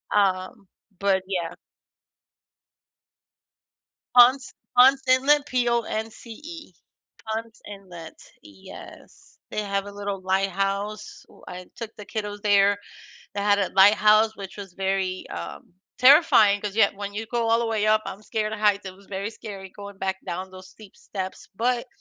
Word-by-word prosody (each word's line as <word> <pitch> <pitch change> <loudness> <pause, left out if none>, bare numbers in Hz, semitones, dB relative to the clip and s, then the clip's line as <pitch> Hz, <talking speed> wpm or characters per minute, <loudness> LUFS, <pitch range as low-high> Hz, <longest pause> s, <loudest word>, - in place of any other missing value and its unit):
um, 190 -1 0 0.3
but 195 -1 +1
yeah. 175 -4 -3 2.6
Ponce 255 +2 +6 0.2
Ponce 265 +2 +6
Inlet, 280 +3 +4
P-O-N-C-E. 240 +5 -3 0.5
Ponce 225 +1 -5
Inlet, 185 -5 -11 0.2
yes. 100 -2 -14
They 215 - -2
have 200 -1 -2
a 205 - -8
little 200 -1 -5
lighthouse, 195 +2 -2
wh - - -19
I 180 0 -8
took 230 -1 -7
the 210 - -9
kiddos 205 -1 -5
there. 205 -1 +4 0.6
That 205 0 +2
had 195 -3 0
a - - -24
lighthouse, 215 +2 +5
which 195 -2 -9
was 200 -3 -9
very, 190 -1 -2
um, 85 - -8 0.2
terrifying, 250 -7 +6
'cause 205 -1 -5
yeah, 210 -3 +5
when 200 0 -6
you 220 +2 -4
go 235 0 -1
all 230 0 +4
the 235 - -1
way 220 -2 0
up- 215 0 +3
I'm 200 - -7
scared 215 0 -3
of 220 - -4
heights- 205 -2 +2
it 185 - -7
was 200 0 -20
very 200 +2 -4
scary 200 -4 -9
going 200 0 -11
back 190 0 -2
down 185 +2 -5
those 185 0 -13
steep 210 -2 -16
steps, 190 -2 -7
but 240 +4 0
205 Hz, 145 wpm, -24 LUFS, 195-225 Hz, 2.6 s, Ponce